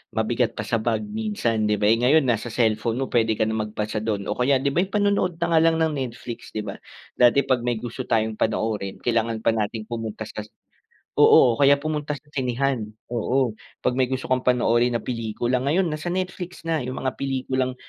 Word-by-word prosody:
mabigat -, -, 0 dB
pa -, -, -1 dB
sa -, -, +1 dB
bag 115 Hz, -, -1 dB
minsan, 210 Hz, -, -1 dB
di 105 Hz, -, +2 dB
ba? 105 Hz, -, +2 dB
Eh, -, -, +5 dB
ngayon 140 Hz, +5 st, +4 dB
nasa 120 Hz, -2 st, 0 dB
cellphone 110 Hz, -1 st, +1 dB
mo 135 Hz, -, -1 dB
pwede 110 Hz, -2 st, +2 dB
ka -, -, +4 dB
nang 110 Hz, -1 st, -1 dB
magbasa 105 Hz, 0 st, -3 dB
dun 105 Hz, -3 st, -2 dB
o -, -, -1 dB
kaya 130 Hz, +1 st, +2 dB
'di 140 Hz, +1 st, 0 dB
ba, 180 Hz, -, +4 dB
panonood 200 Hz, -4 st, +1 dB
na 170 Hz, -1 st, +1 dB
nga -, -, +7 dB
lang 165 Hz, 0 st, +4 dB
ng 160 Hz, -1 st, +2 dB
Netflix 120 Hz, -2 st, -6 dB
di 110 Hz, -, -4 dB
ba, 100 Hz, -, -5 dB, 0.4 s
dati 125 Hz, +3 st, +5 dB
pag 125 Hz, -2 st, +1 dB
may 120 Hz, -2 st, -1 dB
gusto 125 Hz, +2 st, -5 dB
tayong 110 Hz, -2 st, 0 dB
panoorin, 110 Hz, -3 st, -1 dB
kailangan 115 Hz, -1 st, 0 dB
pa 115 Hz, +1 st, +1 dB
natin 110 Hz, 0 st, -3 dB
pumunta 115 Hz, -2 st, -5 dB
sa -, -, -8 dB
sa 105 Hz, -, -18 dB, 0.7 s
oo, 120 Hz, 0 st, +6 dB
kaya 140 Hz, 0 st, +6 dB
pumunta 150 Hz, 0 st, -3 dB
sa 145 Hz, -, -13 dB
sinehan, 125 Hz, -4 st, -1 dB, 0.2 s
oo, 120 Hz, +1 st, +1 dB, 0.3 s
pag 125 Hz, -, +2 dB
may 130 Hz, -, +3 dB
gusto 130 Hz, 0 st, -4 dB
kang 130 Hz, 0 st, +1 dB
panoorin 120 Hz, -1 st, +3 dB
na 115 Hz, -, -2 dB
pelikula, 120 Hz, +1 st, -1 dB
ngayon 160 Hz, +6 st, +1 dB
nasa 155 Hz, +3 st, -5 dB
Netflix 180 Hz, -1 st, -4 dB
na 165 Hz, -1 st, 0 dB
yung 130 Hz, 0 st, -4 dB
mga 130 Hz, -1 st, -2 dB
pelikulang 130 Hz, -1 st, -1 dB
125 Hz, 205 wpm, -24 LUFS, 110-140 Hz, 0.7 s, nga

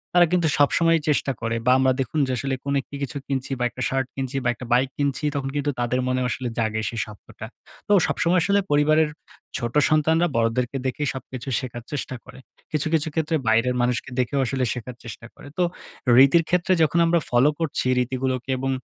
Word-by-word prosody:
তারা 175 Hz, -1 st, +6 dB
কিন্তু 175 Hz, -3 st, +3 dB
সবসময়ই 165 Hz, +3 st, +3 dB
চেষ্টা 140 Hz, -1 st, +1 dB
করে। 115 Hz, 0 st, -1 dB
বা 125 Hz, -, +5 dB
আমরা 130 Hz, 0 st, +4 dB
দেখুন 135 Hz, +4 st, -2 dB
যে, -, -, -2 dB
আসলে 135 Hz, +3 st, -2 dB
কোন 140 Hz, 0 st, -2 dB
একটি 140 Hz, -, -12 dB
কিছু 140 Hz, +1 st, -4 dB
কিনছি, 135 Hz, -1 st, -3 dB
বা -, -, 0 dB
একটা 130 Hz, -, -9 dB
শার্ট 135 Hz, -1 st, -1 dB
কিনছি, 135 Hz, 0 st, -4 dB
বা 120 Hz, -, +1 dB
একটা 125 Hz, -, -9 dB
বাইক 130 Hz, +2 st, +3 dB
কিনছি, 140 Hz, 0 st, -1 dB
তখন 135 Hz, -1 st, -2 dB
কিন্তু 145 Hz, 0 st, 0 dB
তাদের 120 Hz, +1 st, 0 dB
মনেও 130 Hz, 0 st, 0 dB
আসলে 125 Hz, -2 st, -3 dB
জাগে 110 Hz, -1 st, 0 dB
সে 115 Hz, -, -7 dB
শব্দটা। 105 Hz, -2 st, -11 dB, 0.4 s
তো -, -, -2 dB, 0.2 s
সবসময় 175 Hz, +2 st, +2 dB
আসলে 200 Hz, +2 st, +3 dB
পরিবারের 155 Hz, +1 st, +3 dB, 0.5 s
ছোট 120 Hz, -2 st, -4 dB, 0.2 s
সন্তানরা 160 Hz, +3 st, +3 dB
বড়দেরকে 115 Hz, +3 st, 0 dB
দেখেই 145 Hz, +3 st, -1 dB
সবকিছু 130 Hz, -1 st, -8 dB
শেখার 120 Hz, -3 st, -7 dB
চেষ্টা 140 Hz, -3 st, -4 dB
করে। -, -, -13 dB, 0.3 s
কিছু, 155 Hz, 0 st, 0 dB
কিছু 160 Hz, -1 st, +2 dB
ক্ষেত্রে 160 Hz, 0 st, 0 dB
বাইরের 115 Hz, +3 st, +3 dB
মানুষকে 125 Hz, +2 st, -1 dB
দেখেও 130 Hz, +3 st, 0 dB
আসলে 130 Hz, +1 st, -1 dB
শেখার 120 Hz, 0 st, -7 dB
চেষ্টা 120 Hz, 0 st, -9 dB
করে। -, -, -14 dB
তো 180 Hz, -, +3 dB, 0.5 s
রীতির 140 Hz, +6 st, +6 dB
ক্ষেত্রে 180 Hz, +1 st, +2 dB
যখন 165 Hz, +2 st, +2 dB
আমরা 170 Hz, +1 st, +3 dB
ফলো 125 Hz, +4 st, +4 dB
করছি 155 Hz, -5 st, -1 dB
রীতিগুলোকে, 130 Hz, +1 st, -2 dB
এবং 135 Hz, +1 st, -2 dB
135 Hz, 195 wpm, -23 LUFS, 125-150 Hz, 0.5 s, তারা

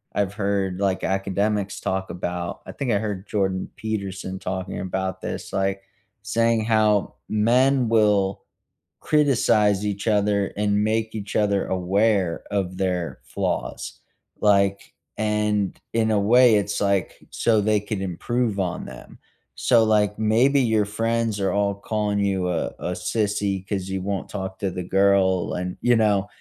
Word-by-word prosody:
I've 100 Hz, -1 st, 0 dB
heard, 100 Hz, -3 st, -1 dB
like, 95 Hz, -2 st, 0 dB
academics 100 Hz, +1 st, -1 dB
talk 95 Hz, 0 st, -2 dB
about. 90 Hz, 0 st, -4 dB
I -, -, -7 dB
think 135 Hz, -4 st, -3 dB
I 100 Hz, -, +2 dB
heard 105 Hz, -2 st, -4 dB
Jordan 95 Hz, -2 st, -1 dB
Peterson 100 Hz, -3 st, -4 dB
talking 95 Hz, 0 st, -4 dB
about 95 Hz, 0 st, -3 dB
this, -, -, -5 dB
like, 95 Hz, 0 st, -1 dB, 0.4 s
saying 115 Hz, +1 st, +1 dB
how 110 Hz, -2 st, +2 dB
men 125 Hz, +3 st, +3 dB
will 105 Hz, -3 st, +3 dB, 0.6 s
criticize 110 Hz, -9 st, +3 dB
each 100 Hz, +1 st, -3 dB
other 105 Hz, -1 st, +2 dB
and 105 Hz, 0 st, +1 dB
make 110 Hz, 0 st, 0 dB
each 105 Hz, -2 st, -6 dB
other 100 Hz, -2 st, +1 dB
aware 95 Hz, -1 st, +1 dB
of 95 Hz, -3 st, -2 dB
their 90 Hz, -3 st, -2 dB
flaws. -, -, -4 dB, 0.4 s
Like, 100 Hz, -1 st, +2 dB, 0.2 s
and 105 Hz, -2 st, 0 dB
in 110 Hz, -1 st, +2 dB
a 105 Hz, -, +3 dB
way, 120 Hz, +2 st, +5 dB
it's 100 Hz, 0 st, 0 dB
like 100 Hz, -2 st, +1 dB, 0.2 s
so 110 Hz, -3 st, +2 dB
they 105 Hz, 0 st, +2 dB
can 105 Hz, -1 st, -4 dB
improve 105 Hz, +4 st, -1 dB
on 90 Hz, -1 st, -2 dB
them. -, -, -12 dB, 0.4 s
So, 115 Hz, -3 st, +4 dB
like, 105 Hz, -2 st, +2 dB
maybe 120 Hz, +6 st, +3 dB
your 110 Hz, -4 st, +2 dB
friends 115 Hz, 0 st, -1 dB
are 95 Hz, -, +1 dB
all 100 Hz, -1 st, +1 dB
calling 105 Hz, 0 st, -2 dB
you 95 Hz, -2 st, 0 dB
a 85 Hz, -, -2 dB
a 90 Hz, -, -3 dB
sissy 100 Hz, 0 st, -1 dB
‘cause 95 Hz, -2 st, -2 dB
you 95 Hz, -1 st, -2 dB
won't 100 Hz, 0 st, -3 dB
talk 95 Hz, -2 st, -5 dB
to 95 Hz, -2 st, -1 dB
the 90 Hz, -, -4 dB
girl 95 Hz, -1 st, +2 dB
and, 90 Hz, 0 st, -4 dB
you 120 Hz, -1 st, +4 dB
know, 105 Hz, -3 st, +2 dB
100 Hz, 150 wpm, -23 LUFS, 95-110 Hz, 0.6 s, way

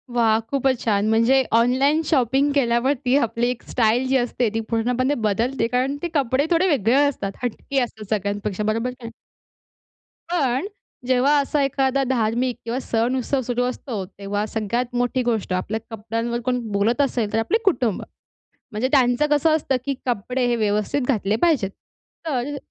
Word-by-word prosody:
वाह! 225 Hz, -2 st, +3 dB
खूपच 270 Hz, -2 st, +1 dB
छान. 205 Hz, -2 st, +1 dB
म्हणजे 230 Hz, +4 st, +4 dB, 0.2 s
ऑनलाईन 270 Hz, +6 st, +3 dB
शॉपिंग 270 Hz, 0 st, +2 dB
केल्यावरती 255 Hz, +1 st, +1 dB
आपली 240 Hz, -2 st, 0 dB
एक 250 Hz, -, -4 dB
स्टाइल 240 Hz, +2 st, +2 dB
जी 265 Hz, +1 st, +3 dB
असते, 245 Hz, -2 st, 0 dB
ती 225 Hz, -, 0 dB
पूर्णपणे 250 Hz, +4 st, +1 dB
बदलते 230 Hz, +5 st, 0 dB
कारण 255 Hz, +3 st, 0 dB
ते 345 Hz, -, -1 dB
कपडे 275 Hz, 0 st, +2 dB
थोडे 345 Hz, +2 st, +3 dB
वेगळे 250 Hz, -, +2 dB
असतात, 205 Hz, -8 st, -3 dB
हटके 270 Hz, +3 st, -2 dB
असतात 220 Hz, -4 st, -8 dB
सगळ्यांपेक्षा 205 Hz, 0 st, -3 dB
बरोबर 230 Hz, +3 st, -2 dB
की -, -, -13 dB
नाही? 230 Hz, -, -6 dB, 1.2 s
पण 275 Hz, -1 st, 0 dB, 0.4 s
जेव्हा 260 Hz, +3 st, +3 dB
असा 285 Hz, +1 st, 0 dB
एखादा 275 Hz, 0 st, +1 dB
धार्मिक 240 Hz, 0 st, 0 dB
किंवा 235 Hz, +2 st, -2 dB
सण 240 Hz, 0 st, 0 dB
उत्सव 260 Hz, +2 st, -1 dB
सुरू 245 Hz, 0 st, -1 dB
असतो, 245 Hz, -4 st, -4 dB
तेव्हा 200 Hz, +2 st, -4 dB
सगळ्यात 235 Hz, +3 st, -2 dB
मोठी 245 Hz, +1 st, 0 dB
गोष्ट 225 Hz, -6 st, -1 dB
आपल्या 195 Hz, +4 st, -2 dB
कपड्यांवर 230 Hz, +2 st, -3 dB
कोण 250 Hz, -1 st, +1 dB
बोलत 210 Hz, +7 st, +1 dB
असेल, 240 Hz, -6 st, 0 dB
तर -, -, +2 dB
आपले 315 Hz, -, +1 dB
कुटुंब. 250 Hz, -, +1 dB, 0.7 s
म्हणजे 220 Hz, +4 st, -1 dB
त्यांचं 255 Hz, 0 st, +3 dB
कसं 310 Hz, +2 st, +3 dB
असतं, 275 Hz, -3 st, 0 dB
की 280 Hz, -, 0 dB
कपडे 250 Hz, +2 st, -1 dB
हे 240 Hz, -, +1 dB
व्यवस्थित 210 Hz, +5 st, 0 dB
घातले 210 Hz, -5 st, +1 dB
पाहिजेत. 300 Hz, -, +2 dB, 0.6 s
तर 275 Hz, -1 st, -2 dB
अ, -, -, -5 dB
245 Hz, 160 wpm, -22 LUFS, 225-270 Hz, 1.2 s, म्हणजे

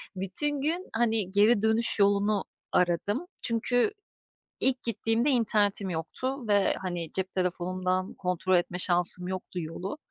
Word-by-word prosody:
bütün 270 Hz, +11 st, -2 dB
gün, 335 Hz, +6 st, -1 dB
hani, 225 Hz, -4 st, +1 dB
geri 205 Hz, +2 st, +5 dB
dönüş 220 Hz, +1 st, +1 dB
yolunu 200 Hz, 0 st, +3 dB, 0.3 s
aradım. 180 Hz, -, +1 dB, 0.2 s
Çünkü 245 Hz, -, +1 dB, 0.7 s
ilk 260 Hz, -1 st, +1 dB
gittiğimde 230 Hz, +3 st, +1 dB
internetim 210 Hz, -6 st, +2 dB
yoktu 235 Hz, -, -3 dB
ve, 205 Hz, -2 st, +3 dB
hani, 175 Hz, -4 st, -4 dB
cep 190 Hz, 0 st, -3 dB
telefonumdan 185 Hz, +1 st, -1 dB
kontrol 180 Hz, 0 st, 0 dB
etme 175 Hz, +1 st, -1 dB
şansım 180 Hz, 0 st, 0 dB
yoktu 185 Hz, -1 st, -4 dB
yolu. 175 Hz, -, -5 dB
200 Hz, 125 wpm, -28 LUFS, 185-230 Hz, 0.7 s, geri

